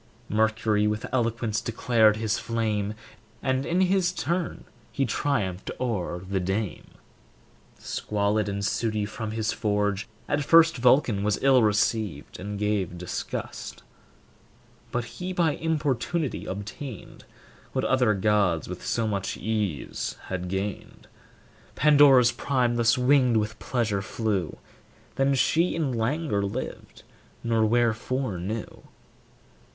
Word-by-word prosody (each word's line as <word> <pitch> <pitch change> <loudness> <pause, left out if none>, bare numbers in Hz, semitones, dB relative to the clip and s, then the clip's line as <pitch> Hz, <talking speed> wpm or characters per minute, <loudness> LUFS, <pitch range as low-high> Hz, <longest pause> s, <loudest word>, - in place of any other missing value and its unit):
Mercury 110 0 +2
with 105 +2 -2
eloquence 115 -3 0
declared 115 -2 +3
his 110 -1 -1
flame, 110 -3 -1 0.5
And 130 +2 0
in 175 +3 +2
his 190 -1 +3
turn 170 0 -2 0.3
he 135 - 0
triumphed 105 -8 -1
o'er 105 -8 -2
the 95 0 0
dame. 95 +3 -3 0.9
Squalid 105 0 -1
and 100 0 -2
sooty 110 0 0
from 110 +1 -5
his 110 +1 -1
forge, 105 -2 0 0.2
at 145 0 0
first 165 +2 +6
Vulcan 120 -4 +3
was 105 -1 +1
ill 135 -2 +6
received, 105 -6 0
and 100 +2 -5
gave 100 -4 -1
disgust; 90 0 -5 1.1
But 120 -1 -1
he 180 +9 -6
by 170 -3 +2
importunity 155 -1 -1
obtained 105 +4 -7 0.5
What - - 0
other 125 -5 +3
gods 100 -4 +2
with 90 0 -7
so 115 -1 0
much 100 -2 -2
ease 105 - -2
had 90 -1 -3
gained. 95 +2 -5 0.7
Pandora's 140 -4 +6
prime 125 -1 0
thus 120 +1 +3
winged 125 -2 +4
with 110 0 -2
pleasure 110 -6 -1
flew, 100 -5 -2 0.6
Then 135 0 +2
she 165 +6 +2
in 155 -5 0
languor 120 0 0
lived, 100 +6 -5 0.4
nor 115 -1 +2
wherefore 120 -1 0
knew. 105 +5 -5
110 Hz, 120 wpm, -26 LUFS, 105-130 Hz, 1.1 s, first